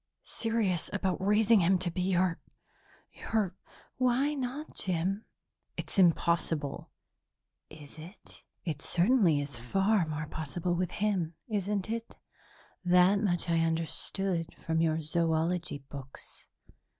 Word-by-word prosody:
"Serious 225 -7 -1
about 185 -1 -1
raising 210 +2 +4
him 185 +1 +4
to 180 -1 -2
be 180 - -2
your 180 -1 +1 0.7
your 210 -5 -1 0.2
" - - -26
"Why 255 +3 +2
not, 275 +2 -4
Jim?" 190 +4 -2 0.5
"It's - - -2
impossible." 165 -4 +1 0.8
"Is 150 0 -12
it? 175 +6 -12 0.2
It 155 -4 -3
certainly 180 - +3
is 140 -4 -5
far 195 - +1
more 155 0 -3
possible 160 +3 -3
with 180 0 0
him, 190 -6 -1
isn't 205 -3 -1
it? 230 0 -5 0.7
That 180 +2 +5
much 175 -5 0
I 165 -1 +2
understood 165 +2 -1
from 160 0 -1
your 160 -1 +1
zoology 165 -1 0
books." 135 -2 -10
180 Hz, 120 wpm, -30 LUFS, 160-205 Hz, 0.8 s, That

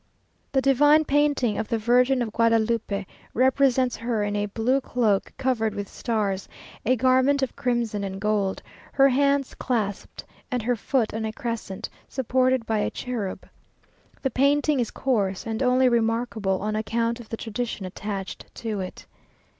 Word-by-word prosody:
The 265 -1 +1
divine 290 +3 +5
painting 285 -7 +2
of 220 - -2
the 230 - 0
Virgin 250 +3 +3
of 220 - -5
Guadalupe, 230 -3 +1 0.3
represents 260 0 +3
her 230 -2 -1
in 205 0 -1
a 205 0 0
blue 235 +6 +1
cloak 220 -7 0
covered 225 -5 0
with 205 -1 -4
stars, 205 -5 -2 0.3
a 255 +3 +3
garment 260 +3 +3
of 265 - -2
crimson 235 -4 -1
and 195 0 -4
gold, 205 -2 0 0.3
her 275 0 +5
hands 280 +1 +2
clasped, 215 -6 -3 0.3
and 250 -3 -1
her 245 +2 +1
foot 235 +1 0
on 220 0 -3
a 220 - -2
crescent, 225 -5 -4 0.2
supported 255 -1 +1
by 220 -1 0
a - - 0
cherub. 230 -7 -5 0.8
The 265 - 0
painting 285 +3 +2
is 235 - 0
coarse, 200 -8 -1
and 225 +1 -3
only 255 0 +4
remarkable 225 -4 0
on 215 0 -1
account 230 +2 -1
of 235 - -11
the 225 - -4
tradition 225 -2 -4
attached 195 +1 -6
to 220 -3 -3
it. 185 -1 -6
235 Hz, 155 wpm, -25 LUFS, 215-260 Hz, 0.8 s, divine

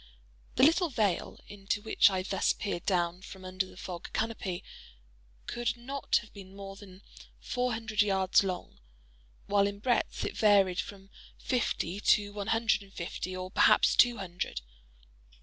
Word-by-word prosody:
The 255 - +3
little 330 +4 +5
vale 210 - -1
into 205 0 -3
which 215 -1 +4
I 190 -1 -2
thus 195 0 +1
peered 200 -5 -4
down 175 -1 +1
from 190 -1 -11
under 185 +1 -2
the - - -15
fog 180 -2 -7
canopy 215 -5 -2 0.8
could 240 0 -2
not 270 +3 -2
have 210 - -17
been 195 -1 -12
more 195 0 -8
than 195 -1 -14 0.4
four 250 -1 -1
hundred 220 -1 0
yards 195 -2 +3
long; 185 -2 -5 0.7
while 200 -1 +3
in 200 0 -5
breadth 240 +3 0
it - - -4
varied 195 -4 +4
from 195 0 -7 0.3
fifty 205 -7 -1
to 205 -1 +3
one 205 -1 -5
hundred 225 -1 +2
and 200 -1 -15
fifty 185 +1 -5
or 185 0 -6
perhaps - - +5
two 240 -1 +5
hundred. 180 - -4
200 Hz, 155 wpm, -30 LUFS, 185-220 Hz, 0.8 s, little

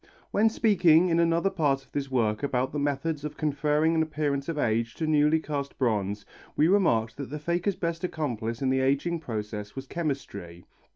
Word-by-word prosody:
When 220 +2 +4
speaking 180 -6 +4
in 165 0 +2
another 170 +3 +2
part 135 -4 0
of - - -32
this 140 -1 -3
work 110 -5 0
about 130 -2 0
the 150 - -3
methods 145 +1 -1
of 150 0 -6
conferring 150 +1 +1
an 160 - +2
appearance 145 -2 -1
of 165 - -3
age 115 -3 0
to 160 - -2
newly 155 0 +3
cast 145 -3 -4
bronze, 105 -5 -1 0.3
we 155 - +4
remarked 115 - +2
that 140 -2 -6
the 150 - -4
faker's 175 +5 -1
best 170 -1 -3
accomplice 125 -8 -3
in 130 - +2
the 130 - +2
ageing 140 +6 +1
process 105 -6 -5
was 135 0 -6
chemistry. 100 - -5
145 Hz, 185 wpm, -27 LUFS, 125-165 Hz, 0.3 s, When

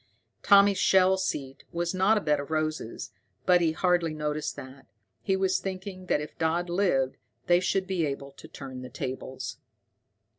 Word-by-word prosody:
Tommy's 200 -1 +6
shell 190 -1 +5
seat 140 -8 -3
was 170 +1 -2
not 190 +4 +3
a - - 0
bed 150 -3 +1
of 140 - -6
roses, 155 -6 -3 0.3
but 180 -1 +5
he 165 -2 +3
hardly 170 -1 +1
noticed 150 0 -2
that. 130 +1 -11 0.3
He 190 - +1
was 190 -1 +1
thinking 185 -1 -6
that - - +2
if 150 - -9
Dodd 170 +2 0
lived 155 -9 +1 0.3
they 175 0 +5
should 190 +1 0
be 185 -5 0
able 140 0 -5
to - - -13
turn 130 -2 -8
the 125 - -8
tables. 130 0 -5
170 Hz, 170 wpm, -28 LUFS, 140-185 Hz, 0.3 s, Tommy's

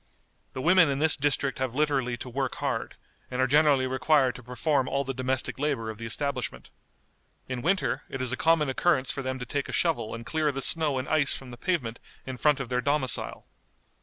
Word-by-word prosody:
The 130 - -5
women 180 -2 +6
in 135 - 0
this 155 +2 +4
district 140 -2 0
have 130 -2 -2
literally 135 -5 +1
to 125 - -7
work 130 +1 -2
hard, - - -3 0.3
and 125 - -4
are 130 - +4
generally 145 -1 +4
required 130 0 +2
to - - -11
perform 130 +3 0
all 140 +1 0
the 135 0 -4
domestic 130 0 -2
labor 135 -7 -1
of 110 - -12
the 115 - -5
establishment. 115 - -3 0.8
In 125 -1 -4
winter 185 +6 +1
it 135 - -5
is 130 -1 0
a - - +1
common 160 +1 +3
occurrence 130 -1 +1
for 135 - -4
them 130 0 -3
to 125 - -6
take 140 +3 -3
a - - -3
shovel 120 -11 0
and 115 0 -8
clear 155 +1 0
the 135 -1 -3
snow 155 -4 +2
and 130 - -3
ice 150 -2 +3
from 130 -2 -9
the - - -8
pavement 120 -7 -2 0.3
in 130 -1 -5
front 150 +1 +3
of 130 -3 -4
their 125 0 0
domicile. 140 -1 -1
135 Hz, 215 wpm, -27 LUFS, 125-150 Hz, 0.8 s, women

